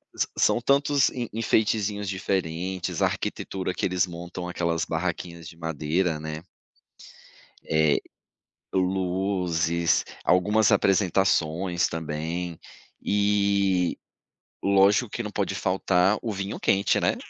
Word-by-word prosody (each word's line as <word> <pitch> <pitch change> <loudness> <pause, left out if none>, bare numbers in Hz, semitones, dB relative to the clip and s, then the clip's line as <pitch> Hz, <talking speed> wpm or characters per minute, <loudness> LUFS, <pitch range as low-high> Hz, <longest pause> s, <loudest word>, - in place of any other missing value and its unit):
sã - - 0
são 120 - +3
tantos 140 +2 +3
en 120 -2 -4
enfeitezinhos 105 -2 0
diferentes, 95 -1 -2
a - - +5
arquitetura 95 -1 -3
que - - -2
eles 90 0 +1
montam 85 +1 -7
aquelas 85 -2 -1
barraquinhas 85 0 -4
de 85 - -15
madeira, 80 +1 -1
né. 80 0 -5 1.2
Eh, 80 -2 +2 0.8
luzes, 90 -3 +1 0.2
algumas 105 +4 +3
apresentações 90 -2 +2
também 80 +2 -4 0.4
e 100 -3 +2 0.6
lógico 100 +4 +4
que 120 - -4
não 105 - -5
pode - - -2
faltar 95 +1 +2
o 115 - -3
vinho 100 +1 -4
quente, 100 +1 +2
né. - - +1
90 Hz, 110 wpm, -26 LUFS, 85-100 Hz, 1.2 s, a